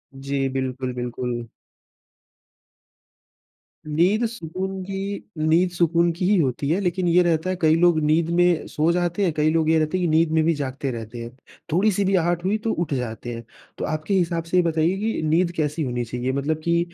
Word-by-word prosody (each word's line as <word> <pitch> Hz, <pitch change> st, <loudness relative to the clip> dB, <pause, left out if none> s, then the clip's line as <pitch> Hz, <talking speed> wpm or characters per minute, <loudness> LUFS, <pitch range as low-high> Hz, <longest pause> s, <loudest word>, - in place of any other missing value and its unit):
जी, 135 Hz, 0 st, -2 dB
बिल्कुल, 130 Hz, -1 st, -3 dB
बिल्कुल। 120 Hz, -1 st, -4 dB, 2.4 s
नींद 180 Hz, +9 st, +2 dB
सुकून 190 Hz, -1 st, -5 dB
की 195 Hz, +1 st, -4 dB, 0.2 s
नींद 160 Hz, +4 st, +3 dB
सुकून 170 Hz, 0 st, +2 dB
की 180 Hz, -, -2 dB
ही 200 Hz, +1 st, +4 dB
होती 140 Hz, -1 st, 0 dB
है, 175 Hz, +5 st, +2 dB
लेकिन 180 Hz, -1 st, 0 dB
ये 175 Hz, +1 st, +5 dB
रहता 170 Hz, +1 st, +1 dB
है, 185 Hz, -, 0 dB
कई 160 Hz, 0 st, +5 dB
लोग 175 Hz, -2 st, +4 dB
नींद 160 Hz, +2 st, +2 dB
में 175 Hz, -2 st, +3 dB
सो 155 Hz, +3 st, +1 dB
जाते 175 Hz, +2 st, 0 dB
हैं, 175 Hz, -, +2 dB
कई 155 Hz, 0 st, +2 dB
लोग 160 Hz, -1 st, +2 dB
ये 160 Hz, -, +4 dB
रहता 155 Hz, +4 st, 0 dB
है -, -, -2 dB
कि 175 Hz, -, +1 dB
नींद 160 Hz, 0 st, +3 dB
में 160 Hz, 0 st, +3 dB
भी 165 Hz, +1 st, +3 dB
जागते 135 Hz, -1 st, -3 dB
रहते 115 Hz, 0 st, -7 dB
हैं। 115 Hz, -, -7 dB, 0.4 s
थोड़ी 200 Hz, +6 st, +3 dB
सी 200 Hz, +2 st, 0 dB
भी 195 Hz, 0 st, +2 dB
आहट 175 Hz, 0 st, +1 dB
हुई 210 Hz, +3 st, +2 dB
तो 225 Hz, -, 0 dB
उठ 165 Hz, -4 st, -2 dB
जाते 120 Hz, -1 st, -4 dB
हैं। 115 Hz, 0 st, -7 dB, 0.3 s
तो -, -, -3 dB
आपके 155 Hz, +5 st, -2 dB
हिसाब 170 Hz, -3 st, +1 dB
से 170 Hz, +2 st, -1 dB
ये 180 Hz, -, +5 dB
बताइए 165 Hz, +3 st, +1 dB
कि 220 Hz, -5 st, -1 dB
नींद 170 Hz, +3 st, +2 dB
कैसी 155 Hz, +1 st, -1 dB
होनी 125 Hz, -2 st, -2 dB
चाहिए? 125 Hz, +2 st, -3 dB
मतलब 140 Hz, +3 st, -1 dB
कि 170 Hz, 0 st, +2 dB
165 Hz, 200 wpm, -23 LUFS, 140-180 Hz, 2.4 s, ये